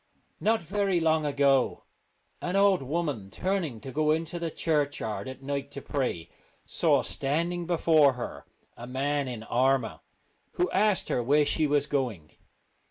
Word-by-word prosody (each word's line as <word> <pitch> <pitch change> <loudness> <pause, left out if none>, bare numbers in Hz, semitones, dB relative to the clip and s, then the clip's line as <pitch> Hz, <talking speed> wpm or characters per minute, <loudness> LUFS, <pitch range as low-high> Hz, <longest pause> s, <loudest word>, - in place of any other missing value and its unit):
Not 220 -3 +1
very 195 0 0
long 160 -2 +2
ago 140 -2 +2 0.6
an 180 +2 -2
old 195 -3 +4
woman, 140 - -3
turning 170 - -2
to 135 - -7
go 150 +2 0
into 160 +2 0
the 170 -1 -2
churchyard 145 -11 -1
at 130 +1 -10
night 140 0 -3
to 140 - -6
pray, 125 - -3 0.3
saw - - +2
standing 170 +5 -1
before 160 -5 +4
her 125 -1 -7 0.3
a 120 - -9
man 140 +2 -1
in 120 -3 -6
armour, 130 0 +1 0.5
who 180 - 0
asked 210 -1 +2
her - - +1
where 145 +5 +3
she 155 +1 +1
was 145 0 +2
going. 120 - -3
145 Hz, 150 wpm, -28 LUFS, 130-170 Hz, 0.6 s, old